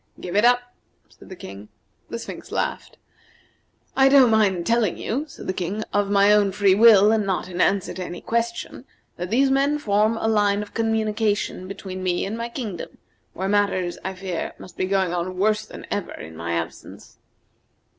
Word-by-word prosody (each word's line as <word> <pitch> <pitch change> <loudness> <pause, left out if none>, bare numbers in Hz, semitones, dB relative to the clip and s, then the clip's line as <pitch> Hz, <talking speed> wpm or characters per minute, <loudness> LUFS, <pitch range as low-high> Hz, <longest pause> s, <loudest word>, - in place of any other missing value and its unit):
"Give 175 - -6
it 205 - +4
up," 245 0 +3 0.4
said - - -17
the 190 - -8
King. 100 - -10 0.4
The - - -4
Sphinx - - -9
laughed. - - -3 1.0
"I 270 0 +5
don't 265 -4 +6
mind 195 -6 +2
telling 230 -5 +1
you," 270 +7 -2
said - - -11
the 185 - -2
King, 190 +4 -3
"of 205 -1 +1
my 200 +1 +5
own 205 -2 +3
free 200 -1 +4
will, 210 -1 +7
and 220 -1 +2
not 190 -2 -2
in 180 0 -3
answer 195 -2 +1
to 185 - -5
any 175 0 -7
question, 235 +2 -3 0.3
that 175 +1 -4
these 265 +5 +3
men 280 +2 +2
form 215 -3 +1
a 220 - -1
line 205 -2 +2
of 210 - -13
communication 220 -4 -1
between 185 -1 -7
me 180 -1 0
and 200 +3 -4
my 230 +1 -4
kingdom, 220 - -6 0.4
where 190 - -3
matters, 195 -3 0
I 190 0 -4
fear, 185 -2 -4
must 180 - -13
be - - -1
going 190 -2 0
on 180 +1 -3
worse 210 +2 +1
than - - -10
ever, 205 -3 -3
in 80 +1 -10
my 85 +1 -4
absence." 85 0 -6
205 Hz, 185 wpm, -23 LUFS, 185-225 Hz, 1.0 s, will